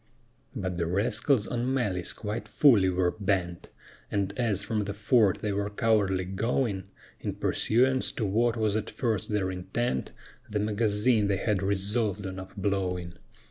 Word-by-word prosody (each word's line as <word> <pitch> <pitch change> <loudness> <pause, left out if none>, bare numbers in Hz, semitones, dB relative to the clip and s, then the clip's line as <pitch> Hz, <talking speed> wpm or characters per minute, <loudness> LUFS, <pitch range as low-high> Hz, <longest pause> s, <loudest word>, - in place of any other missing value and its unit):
But 90 -2 -3
the 85 - 0
rascals 105 - +2
on 125 +1 -2
malice 100 -10 0
quite 105 0 -4
fully 110 -10 +5
were 90 -1 +1
bent: 95 -4 -2 0.4
And 100 -1 -1
as 105 -5 0
from 105 -1 -1
the 100 0 -4
fort 105 -1 +3
they 105 - 0
were 100 +1 -1
cowardly 105 -4 +1
going, 100 +1 -1 0.3
In - - -4
pursuance 130 +3 +1
to 110 - -2
what 115 +4 +1
was 110 -2 +1
at 110 - -2
first 115 -7 -2
their 100 -3 0
intent, 90 - -2 0.4
The 105 - -2
magazine 105 +1 +2
they 100 -1 +1
had 105 -1 0
resolved 100 +1 0
on 95 0 -5
up 95 +2 -10
blowing. 90 -3 -1
105 Hz, 155 wpm, -28 LUFS, 95-115 Hz, 0.4 s, fully